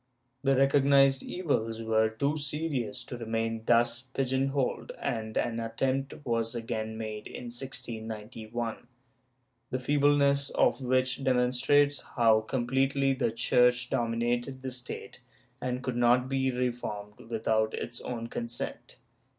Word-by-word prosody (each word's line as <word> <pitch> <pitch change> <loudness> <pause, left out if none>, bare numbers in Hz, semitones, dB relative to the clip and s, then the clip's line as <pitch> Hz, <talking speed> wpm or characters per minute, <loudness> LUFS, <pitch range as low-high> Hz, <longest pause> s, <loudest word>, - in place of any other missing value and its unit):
The 135 -1 +3
recognized 135 0 +5
evils 115 -10 -2
were 110 0 +3
too 140 +7 -1
serious 145 -5 -2
to 125 - -7
remain 115 0 -2
thus 120 0 +3
pigeon 130 +1 -1
holed, 135 -2 -1
and 110 -1 -3
an 115 -1 0
attempt 135 +5 -2
was 115 0 0
again 110 -1 -3
made 110 -1 -5
in 120 -1 -7
1691, 115 -2 -5 0.8
the 130 - -1
feebleness 140 +1 +3
of - - +3
which 130 +1 +1
demonstrates 130 +3 +3 0.2
how 115 -2 +6
com 120 +3 -2
pletely 135 +1 +2
the 120 - 0
Church 125 +1 +3
dominated 120 +3 -1
the 130 - -3
State 125 0 -7 0.4
and 125 0 -2
could 125 -2 -2
not 120 +1 +4
be 135 0 +1
reformed 120 -5 -3
without 110 -1 +1
its 120 0 -5
own 115 -2 -4
consent. 115 0 -5
125 Hz, 125 wpm, -29 LUFS, 115-135 Hz, 0.8 s, how